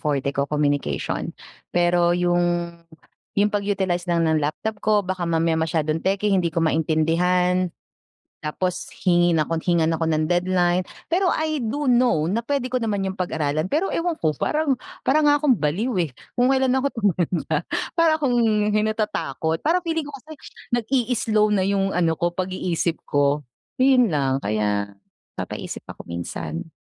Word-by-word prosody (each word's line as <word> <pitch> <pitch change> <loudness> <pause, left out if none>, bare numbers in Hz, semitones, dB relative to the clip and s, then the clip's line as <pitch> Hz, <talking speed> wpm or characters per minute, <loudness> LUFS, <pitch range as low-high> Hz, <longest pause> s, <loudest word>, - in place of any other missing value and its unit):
forte 140 -2 -1
ko, 140 - +1
communication. 145 - -1 0.4
Pero 175 0 +3
yung 175 -1 +1 0.6
yung 205 +1 +4
pag-utilize 195 -4 0
lang 170 -1 +2
ng 155 -1 +2
laptop 205 +8 -3
ko, 210 -1 +3
baka 185 -2 -2
mamaya 165 -1 +1
masyadong 160 -1 0
techy, 195 +1 +1
hindi 175 -3 +1
ko 165 - -2
maintindihan, 170 +3 +2 0.7
tapos 180 +4 -3 0.2
hingin 175 -2 +4
ako 165 +2 0
hingan 165 -2 +2
ako 165 - -2
ng 155 0 +1
deadline. 180 0 +2 0.2
Pero 365 +2 +2
I 310 -4 -1
do 280 +5 -2
know 240 -11 +3
na 225 +5 -1
puwede 275 -1 -1
ko 255 - -4
naman 205 -5 -1
yung 190 - -4
pag-aralan, 155 -1 -1
pero 330 +6 +1
ewan 335 -1 -2
ko, 155 -2 0
parang 300 -3 0 0.3
para 305 +3 +2
nga 290 0 +4
akong 275 -5 +4
baliw 195 - -1
eh. 155 - -5 0.2
Kung 250 +2 +3
kailan 265 -1 +2
ako 265 +1 +1
tumanda, 175 -6 0 0.3
para 325 -2 +3
akong 265 -5 +1 0.4
hi 215 - +3
natatakot. 210 -8 -2
Parang 345 +4 +2
feeling 325 -1 0
ko 290 - -8
kasi 310 +5 -15 0.4
nag-i-slow 230 -3 +1
na 190 - +2
yung 195 -1 0
ano 165 -2 +1
ko, 175 0 0
pag-iisip 180 -3 -1
ko, 145 -1 +1 0.3
yun 255 -6 +5
lang. 135 -2 0
Kaya, 105 -1 0 0.5
papaisip - - -6
ako - - -9
minsan. 85 - -5
180 Hz, 155 wpm, -23 LUFS, 160-230 Hz, 0.7 s, yun